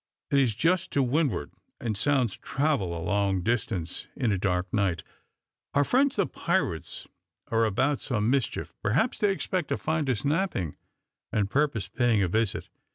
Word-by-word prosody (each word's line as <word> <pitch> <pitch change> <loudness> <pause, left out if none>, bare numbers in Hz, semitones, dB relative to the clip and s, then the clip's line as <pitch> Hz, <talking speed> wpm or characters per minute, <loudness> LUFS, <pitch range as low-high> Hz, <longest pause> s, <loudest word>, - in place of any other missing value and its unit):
It 140 - +5
is 120 -6 +2
just 170 - +2
to 140 - +3
windward, 130 - 0 0.3
and 110 -3 -2
sounds 125 -1 +1
travel 135 - -1
a 80 - -5
long 100 -3 +1
distance 95 -6 -1
in 125 -6 +1
a 100 - +1
dark 90 -1 -1
night. 95 -6 +1 0.7
Our 145 - +5
friends, 265 - +2
the 200 - +2
pirates, 90 - -2 0.4
are 115 0 +3
about 135 +7 +1
some 110 -6 -1
mischief. 130 0 0
Perhaps 135 - +1
they 205 -2 +3
expect 185 -3 -1
to - - 0
find 155 -3 -1
us 125 +1 -1
napping, 150 - 0 0.6
and 100 -1 0
purpose 140 -9 +1
paying 115 0 +2
a - - +2
visit." 110 +3 0
120 Hz, 160 wpm, -27 LUFS, 100-145 Hz, 0.7 s, It